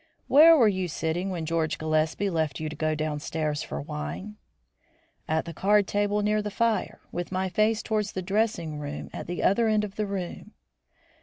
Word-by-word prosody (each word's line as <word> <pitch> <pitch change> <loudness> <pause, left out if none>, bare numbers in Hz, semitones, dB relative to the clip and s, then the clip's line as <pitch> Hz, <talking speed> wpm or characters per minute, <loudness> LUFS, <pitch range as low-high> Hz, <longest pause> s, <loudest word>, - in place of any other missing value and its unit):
"Where 320 +3 +8
were 235 -6 +6
you 190 -3 0
sitting 170 +3 -2
when 175 -4 -3
George 160 -1 0
Gillespie 155 +5 0
left 160 -5 -1
you 155 -1 -3
to 155 - -7
go 155 +1 0
downstairs 150 0 -2
for 70 - -5
wine?" 75 +8 -6 0.9
"At 160 0 0
the 170 - -6
card 205 +2 +3
table 205 +1 0
near 210 +1 +2
the 210 - -3
fire, 230 +1 0
with 175 +1 -4
my 190 0 -1
face 215 +3 +1
towards 210 -2 -1
the 185 - -3
dressing 185 -6 -1
room 145 0 -6
at - - -6
the 175 +1 -3
other 225 +4 +3
end 215 -1 +2
of 205 -1 -6
the 210 -1 -1
room." 195 +2 -5
180 Hz, 185 wpm, -27 LUFS, 155-210 Hz, 0.9 s, Where